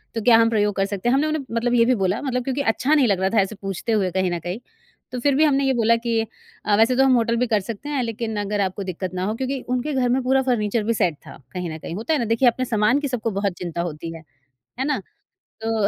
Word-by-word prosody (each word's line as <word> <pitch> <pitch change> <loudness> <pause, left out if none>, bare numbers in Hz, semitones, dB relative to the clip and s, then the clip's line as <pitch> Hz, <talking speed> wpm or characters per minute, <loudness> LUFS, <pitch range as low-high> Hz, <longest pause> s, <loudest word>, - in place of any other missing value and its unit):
तो 225 - -1
क्या 230 0 +6
हम 230 0 +4
प्रयोग 210 -2 +1
कर 195 0 +1
सकते 200 +3 -2
हैं?" 245 - +3
हमने 295 +3 +2
उन्हें 310 -1 -1
मतलब 240 +1 +1
ये 230 -1 +5
भी 255 - +3
बोला 190 +5 0
मतलब 250 -3 -1
क्योंकि 265 +2 -2
अच्छा 270 +7 0
नहीं 285 -5 +4
लग 195 -3 +1
रहा 190 - +1
था - - +4
ऐसे 195 +3 -3
पूछते 195 +3 -3
हुए 195 -4 +1
कहीं 185 0 0
न 175 - -2
कहीं 175 +6 -5 0.5
तो 250 - -4
फिर 280 +2 +2
भी 305 - +4
हमने 280 -2 +3
ये 265 - +2
बोला 230 -1 +3
कि 230 -1 -1 0.5
अ, 205 - +3
"वैसे 230 +3 +4
तो 265 - +4
हम 265 -1 +4
होटल 230 -1 +2
भी 250 +1 +1
कर 220 -3 +2
सकते 230 +7 -7
हैं, 285 -3 0
लेकिन 230 -1 -3
अगर 205 0 -1
आपको 195 +1 -2
दिक्कत 185 0 -5
ना 180 - -2
हो" 215 +3 -1
क्योंकि 265 +2 -2 0.2
उनके 280 +4 -2
घर 255 -2 +1
में 255 +2 +2
पूरा 265 +1 +3
फर्नीचर 215 -1 0
भी 230 - +1
सेट 175 -7 +1
था - - -10 0.2
कहीं 180 -2 -3
न 155 - -6
कहीं 165 - -6
होता 225 - -1
है 295 - +1
ना 235 - 0
देखिए 250 +3 +3
अपने 255 +2 -2
सामान 225 +3 +2
की 290 - -2
सबको 235 -4 -2
बहुत 200 -2 0
चिंता 170 -1 -3
होती 165 -1 -5
है। 160 - -11 0.6
है 265 - 0
ना? 295 - 0 0.6
तो, 220 -2 +1
230 Hz, 285 wpm, -22 LUFS, 195-255 Hz, 0.6 s, क्या